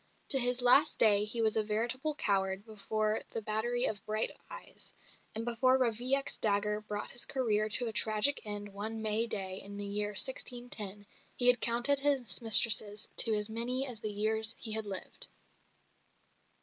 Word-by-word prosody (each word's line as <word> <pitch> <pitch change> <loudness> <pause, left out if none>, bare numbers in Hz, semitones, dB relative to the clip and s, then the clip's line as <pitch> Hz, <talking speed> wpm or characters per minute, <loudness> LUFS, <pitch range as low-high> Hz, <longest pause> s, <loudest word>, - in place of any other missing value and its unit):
To 270 - +2
his 245 0 +1
last 275 +5 +4
day 210 -2 +4
he 225 +2 -1
was 220 -1 0
a 220 - +1
veritable 235 +8 -3
coward 195 -3 -2
before 215 0 -4
the 225 - -5
battery 240 +4 -2
of 205 - -4
bright 215 +1 -3 0.2
eyes; - - -10 0.4
and 225 +1 -4
before 250 +2 +1
Ravaillac's 255 +3 0
dagger 210 0 -1
brought 210 -1 -7
his 245 - -4
career 215 -5 -2
to 245 +4 +5
a 225 - -6
tragic 215 +7 +2
end 205 -1 -5
one 220 +2 -7
May 220 +2 0
day 190 -3 -5
in 200 +1 -10
the 205 - -6
year 205 +1 -4
1610 215 -3 -2 0.3
he 245 - +2
had 245 -1 +5
counted 240 +4 +1
his 270 -8 -2
mistresses 215 -2 +7
to 225 -2 +6
as 210 0 -1
many 240 +4 0
as 245 -5 -6
the 215 - -5
years 220 +2 -2
he 225 - 0
had 220 -1 0
lived. 200 - -4
220 Hz, 170 wpm, -30 LUFS, 210-245 Hz, 0.4 s, mistresses